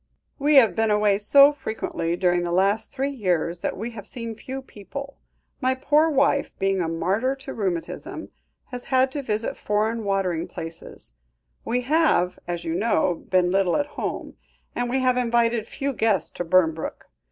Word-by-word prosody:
"We 295 +2 +3
have 225 -10 +6
been 225 0 +1
away 210 -1 +3
so 280 +7 +6
frequently 220 -10 -3
during 175 -1 +2
the 175 - -2
last 195 +4 +1
three 275 +1 -2
years 175 - -1
that - - -3
we 225 +5 -4
have 210 -4 -9
seen 230 -2 -6
few 265 +4 -7
people. 275 +6 -9 0.4
My 260 0 +2
poor 295 +4 +3
wife 280 -1 +2
being 195 -1 +1
a 165 - -1
martyr 195 +11 0
to 270 0 -8
rheumatism, 185 -6 -4 0.4
has 250 -1 -6
had 260 0 +2
to 285 - -2
visit 220 -3 -2
foreign 220 +2 -1
watering 195 -5 -1
places; 165 - -9 0.5
we 245 +2 -1
have, 270 - +2
as 175 -1 -4
you 165 - -2
know, 185 -2 +1 0.2
been 180 -1 +3
little 190 -2 +2
at 290 - 0
home, - - -5 0.4
and 245 0 -2
we 260 +2 0
have 255 -1 +2
invited 235 -2 +1
few 280 0 -3
guests 215 -7 +1
to - - -4
Burnbrooke. 165 -2 +1
220 Hz, 170 wpm, -24 LUFS, 180-260 Hz, 0.5 s, have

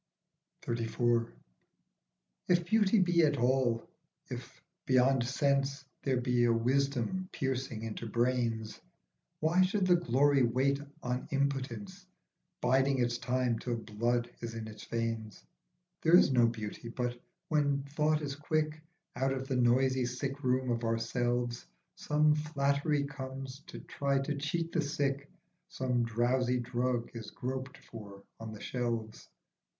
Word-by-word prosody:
37 115 +1 -1
XXXIV. 115 -1 +2 1.2
IF 175 -1 +3
Beauty 215 +2 +3
be 175 -2 +4
at 145 -3 +3
all, 120 -2 +1 0.4
if, - - -7 0.3
beyond 130 0 +4
sense, 140 0 +1 0.2
There 130 -2 +1
be 125 -1 +2
a 120 - +4
wisdom 140 +9 0
piercing 130 -4 -2
into 115 +1 -5
brains, 115 -1 0 0.6
Why 165 +4 +3
should 190 +1 +2
the 180 -1 +5
glory 140 -2 +3
wait 130 +4 +2 0.2
on 125 +1 -2
impotence, 140 +8 -2 0.5
Biding 130 +2 +3
its 120 -1 0
time 125 -1 0
till 120 -1 -2
blood 120 +2 -1
is 115 -1 -6
in 115 -1 -5
the 110 - -8 0.2
veins? 115 -2 -3 0.6
There 165 +2 +6
is 160 - +5
no 120 -2 +5
beauty, 115 0 -5
but, 120 0 -3 0.3
when 145 -3 +2
thought 150 +2 0
is 140 -2 -3
quick, 155 +1 -1 0.3
Out 135 +2 +1
of 130 0 -4
the 135 - -1
noisy 130 +1 +3
sickroom 130 0 -1
of 115 0 -1
ourselves 120 - -1 0.3
Some 150 0 +3
flattery 145 -1 +1
comes 135 -1 -6
to - - -8
try 140 -1 -1
to 145 +2 -2
cheat 165 +4 -2
the 170 - +1
sick, 140 -1 -1 0.4
Some 125 -2 0
drowsy 125 +2 +1
drug 120 0 -1
is 115 -2 -7
groped 130 +1 -5
for 100 -3 -11 0.2
on 110 -1 -6
the 110 - -9
shelves. 115 -3 -3
130 Hz, 135 wpm, -32 LUFS, 120-140 Hz, 1.2 s, There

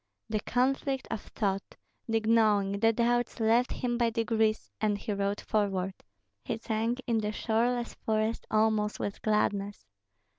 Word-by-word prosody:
The 215 - +1
conflict 265 +3 0
of 225 -2 -2
thought, 195 -3 -3 0.3
the 225 -1 +1
gnawing, 210 -3 +3
the 225 +1 +5
doubts 240 +1 +1
left 230 +3 +3
him 240 -1 -2
by 235 -1 +3
degrees, 225 -1 0
and 210 -1 +2
he 210 - -3
rode 200 0 -1
forward; 195 -3 0 0.5
he - - -2
sank 230 +3 -2
in 230 -3 +1
the 210 -1 -1
shoreless 235 +2 0
forest 220 +1 -1
almost 215 -1 +2
with 200 - -4
gladness. 205 - 0
220 Hz, 145 wpm, -30 LUFS, 210-235 Hz, 0.5 s, the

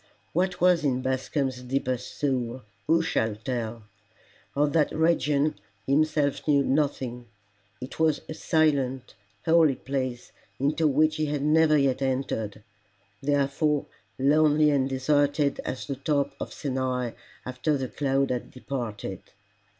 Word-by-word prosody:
What 180 +2 0
was 180 -2 +4
in 130 -3 0
Bascombe's 130 0 -1
deepest 125 -1 -3
soul 130 -3 -1 0.2
who 165 0 +4
shall 110 -9 0
tell? 115 -1 -4 0.7
Of 145 0 +2
that 155 -3 +3
region 155 -2 +1 0.3
he - - -2
himself 150 -1 +1
knew 140 -2 +4
nothing. 130 -4 -1 0.5
It 130 +5 -8
was 160 -2 +2
a - - -5
silent, 140 -6 +1 0.3
holy 160 -4 +5
place 130 -2 -4 0.3
into 150 +4 +2
which 155 +2 +2
he 155 -1 0
had 145 -1 -2
never 155 0 +4
yet 135 -2 +1
entered 120 -6 -2 0.6
therefore 145 +1 +1 0.3
lonely 150 +2 +4
and 135 -2 +1
deserted 145 +2 +1
as 130 - -4
the 140 -2 -4
top 140 0 0
of - - -5
Sinai 130 -3 -2 0.3
after 130 +4 -1
the 130 -1 -3
cloud 135 +3 0
had 125 -1 -3
departed. 115 -8 -5
140 Hz, 130 wpm, -26 LUFS, 130-150 Hz, 0.7 s, holy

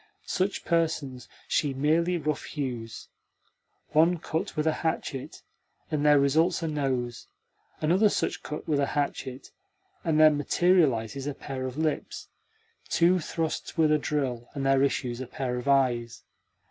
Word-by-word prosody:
Such 190 +2 -1
persons 155 -6 -1 0.2
she 140 -3 0
merely 165 +6 +2
roughhews. 135 -7 -4 0.8
One 165 +3 +4
cut 160 +4 -4
with 150 - +1
a 160 - +3
hatchet, 150 -5 -3 0.5
and 150 -2 0
there 150 -1 +6
results 155 +5 +2
a - - 0
nose; 130 -6 -2 0.5
another 180 +7 +4
such - - -1
cut 150 - -6
with 150 -3 +1
a 140 - +2
hatchet, 135 -2 -3 0.5
and 155 -2 +1
there 155 0 +8
materialises 145 -5 +2
a 145 - -3
pair 130 -2 -5
of 130 +2 -7
lips; 155 -1 -2 0.6
two 175 +2 +4
thrusts 165 0 -3
with 155 -2 +4
a 150 - +4
drill, 130 -6 -2
and 135 -1 -2
there 135 0 +4
issues 130 -3 0
a 130 - -5
pair 125 0 -3
of 125 - -6
eyes. 125 -4 +1
145 Hz, 145 wpm, -27 LUFS, 130-160 Hz, 0.8 s, there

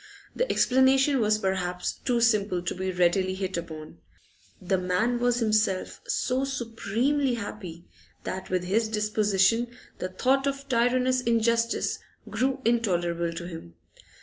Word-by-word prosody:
The - - 0
explanation 265 +2 +3
was 215 -1 +3
perhaps 180 -3 -2
too 245 -3 -1
simple 205 -6 +2
to 180 - -2
be 190 0 -3
readily 185 +1 +1
hit 190 -1 -3
upon; 160 - -7 0.6
the 190 0 0
man 185 +7 0
was 245 0 +2
himself 215 -4 0
so 255 +1 0
supremely 250 +1 -1
happy 185 -6 -7 0.4
that 190 0 -5
with 185 -1 0
his 215 +5 +1
disposition 210 +1 +2 0.3
the 185 - -3
thought 265 +8 +1
of 275 0 -3
tyrannous 255 +1 +2
injustice 230 0 +1 0.3
grew 265 +1 -1
intolerable 175 -7 +1
to 170 +1 -6
him. 165 - -10
215 Hz, 130 wpm, -27 LUFS, 185-245 Hz, 0.6 s, explanation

